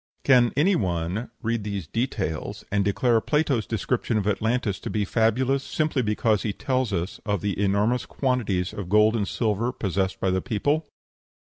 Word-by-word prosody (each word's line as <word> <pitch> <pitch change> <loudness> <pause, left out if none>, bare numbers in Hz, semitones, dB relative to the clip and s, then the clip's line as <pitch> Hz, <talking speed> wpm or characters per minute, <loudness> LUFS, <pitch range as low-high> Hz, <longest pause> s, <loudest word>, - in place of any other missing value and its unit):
Can 125 -3 +5
any 185 +7 +4
one 90 - -2
read 115 -1 -1
these 100 -4 -4
details 95 - -3
and 100 0 +2
declare 115 +3 +2
Plato's 145 -6 +1
description 115 0 -1
of 105 - -1
Atlantis 105 0 0
to - - -6
be 105 -2 0
fabulous, 125 +6 +1
simply 155 -3 0
because 105 -1 +1
he 105 - -2
tells 130 -2 -1
us 90 0 -3
of 100 -4 -1
the 100 -1 -2
enormous 105 +5 +1
quantities 110 -9 -1
of 95 -3 -6
gold 105 +2 +4
and 105 -3 0
silver 115 +1 0
possessed 95 -3 -2
by 95 - +1
the 95 0 0
people? 145 +7 0
110 Hz, 170 wpm, -25 LUFS, 100-125 Hz, -, Can